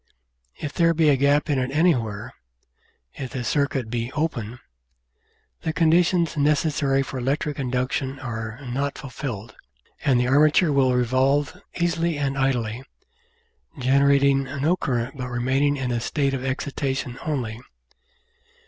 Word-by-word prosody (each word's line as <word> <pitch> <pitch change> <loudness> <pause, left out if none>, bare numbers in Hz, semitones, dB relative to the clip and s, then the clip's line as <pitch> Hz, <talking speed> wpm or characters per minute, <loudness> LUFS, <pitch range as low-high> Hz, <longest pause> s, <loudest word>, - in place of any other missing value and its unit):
If 145 - -6
there 165 -1 +3
be 155 -1 +4
a 145 - +5
gap 140 +3 +2
in 145 -4 +1
it 130 0 -1
anywhere 125 - 0 0.8
if 130 - -6
the 125 - -3
circuit 135 -2 0
be 120 +1 -2
"open" 125 -8 -2 1.0
the 160 - -2
conditions 170 +1 +3
necessary 145 -2 +2
for 130 - -6
electric 145 +3 -1
induction 130 +1 -1
are 115 -2 -5
not 135 +3 -2
fulfilled, 120 -6 -6 0.5
and 130 -3 +3
the 125 - +1
armature 150 +4 +4
will 130 -2 +3
revolve 130 +5 +2 0.2
easily 170 -2 0
and 140 -1 -1
idly, 125 -4 0 1.0
generating 140 +1 +3
no 140 +6 0
current 130 -5 -2
but 125 -1 -4
remaining 135 +4 +1
in 130 -2 -2
a 120 - 0
state 140 +3 0
of 130 -1 -3
excitation 135 -1 -3
only. 120 -7 -3
135 Hz, 130 wpm, -24 LUFS, 125-145 Hz, 1.0 s, a